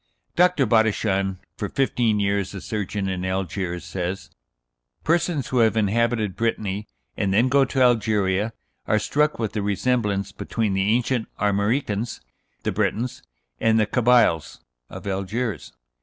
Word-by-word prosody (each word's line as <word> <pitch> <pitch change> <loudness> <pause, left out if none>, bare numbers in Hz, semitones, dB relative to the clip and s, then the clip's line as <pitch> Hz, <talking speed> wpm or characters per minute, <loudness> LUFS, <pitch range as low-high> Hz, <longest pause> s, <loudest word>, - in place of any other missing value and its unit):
Dr. 180 -5 +4
Bodichon, 105 -4 +1 0.2
for - - -3
fifteen 120 -5 +1
years 100 -1 0
a 95 - -6
surgeon 105 -2 -3
in 95 -1 -3
Algiers, 95 -1 -3
says: 90 +1 -4 0.7
"Persons 165 -5 +1
who 130 - +1
have 110 -1 +3
inhabited 110 -1 +1
Brittany, 105 -3 -2 0.3
and 100 -2 0
then 115 +6 +3
go 135 +1 +4
to 130 0 +1
Algeria, 105 -4 +2 0.4
are 110 - +3
struck 150 +8 +1
with 110 -3 -2
the 105 - -1
resemblance 100 -1 0
between 110 -4 -2
the 95 +1 +1
ancient 125 -1 0
Armoricans 105 +2 0 0.4
(the - - 0
Brètons) 120 +3 -1 0.4
and 115 0 +3
the 110 - +3
Cabyles 120 - +3 0.3
(of - - -9
Algiers). 100 - -3
110 Hz, 135 wpm, -23 LUFS, 100-120 Hz, 0.7 s, Dr